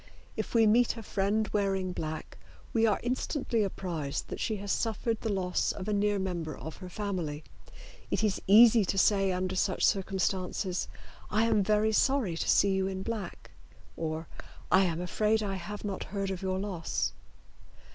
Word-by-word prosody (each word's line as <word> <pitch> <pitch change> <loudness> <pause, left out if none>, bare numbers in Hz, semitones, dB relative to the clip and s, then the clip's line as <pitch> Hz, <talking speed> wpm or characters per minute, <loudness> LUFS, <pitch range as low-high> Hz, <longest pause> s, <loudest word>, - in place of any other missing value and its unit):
If - - -4
we 225 -1 +6
meet 235 +2 +3
a 225 - -7
friend 210 +2 0
wearing 195 -3 0
black 155 -2 -5 0.3
we 225 -1 +4
are 210 - +2
instantly 250 -1 -1
apprised 170 -7 -3
that - - -5
she 220 - -1
has 200 -1 -4
suffered 225 0 -1
the 225 - -1
loss 185 -2 0
of 195 0 -6
a 210 - 0
near 205 0 +2
member 175 -5 -3
of 160 - -8
her 185 -1 -9
family. 180 -7 -3 0.7
It - - 0
is 210 -3 +1
easy 225 +2 +8
to 195 +1 -2
say 195 0 +3
under 185 +1 -2
such 185 0 +1
circumstances, 190 -1 0 0.4
"I 215 +2 +2
am 220 -2 +3
very 210 +2 +2
sorry 240 -5 +2
to - - -2
see 200 - +4
you 190 0 +1
in 190 0 -4
black," 215 -5 -5 0.4
or 160 0 -3 0.4
"I 190 +1 +6
am 170 -2 -1
afraid 215 +4 +1
I 195 -2 -2
have 205 +4 -7
not 200 -2 -3
heard 195 -1 -3
of 185 - -5
your 190 -1 -1
loss." 190 -4 -2
195 Hz, 175 wpm, -30 LUFS, 185-215 Hz, 0.7 s, easy